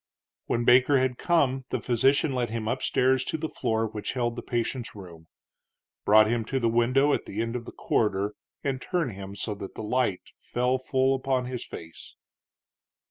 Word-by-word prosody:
When 120 0 0
Baker 125 +3 +6
had 130 -1 0
come 135 -7 +2
the - - -1
physician 135 +4 +2
led 125 -2 -1
him 110 -1 -3
up 125 +3 -1
stairs 130 0 +2
to - - -2
the 160 +1 -3
floor 110 -6 -1
which 110 -1 -4
held 120 -2 -1
the 120 - -5
patient's 120 0 -3
room, 85 -5 -11 0.8
brought 110 +1 +7
him 115 +1 0
to 135 +3 -1
the 120 - +1
window 130 +5 +3
at - - -1
the 100 - -6
end 115 +1 -1
of 120 -1 -4
the - - -8
corridor 105 -1 0 0.3
and 135 -2 -2
turned 170 -8 -1
him 100 0 -8
so 105 +2 -3
that 100 -1 -8
the - - -6
light 110 -4 0 0.2
fell 125 +1 0
full 130 0 +1
upon 130 -1 0
his 125 -1 -5
face. 80 0 -10
120 Hz, 190 wpm, -27 LUFS, 110-130 Hz, 0.8 s, brought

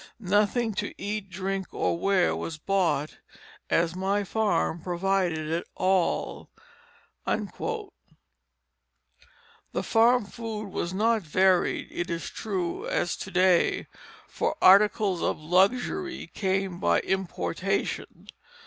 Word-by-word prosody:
Nothing 210 +3 +1
to - - -7
eat, 205 0 -4
drink 190 0 -3
or - - +1
wear 185 +1 +2
was 165 -2 -5
bought, 155 -4 0 0.5
as 165 +1 +2
my 195 +2 0
farm 195 -5 0
provided 175 -3 0
all." 185 -1 0 0.8
The - - +1 2.4
farm 230 +1 +4
food 215 -1 -6
was 175 -2 -3
not 220 +3 +2
varied, 185 +2 +2
it 175 - -3
is 170 -1 -4
true, 185 -5 -3
as 175 - 0
to - - -6
day; 185 -2 +3 0.4
for - - -1
articles 200 -2 +5
of - - 0
luxury 195 - +1
came 190 -2 -1
by 85 0 +2
importation. 190 -2 -2
190 Hz, 105 wpm, -27 LUFS, 175-205 Hz, 2.4 s, articles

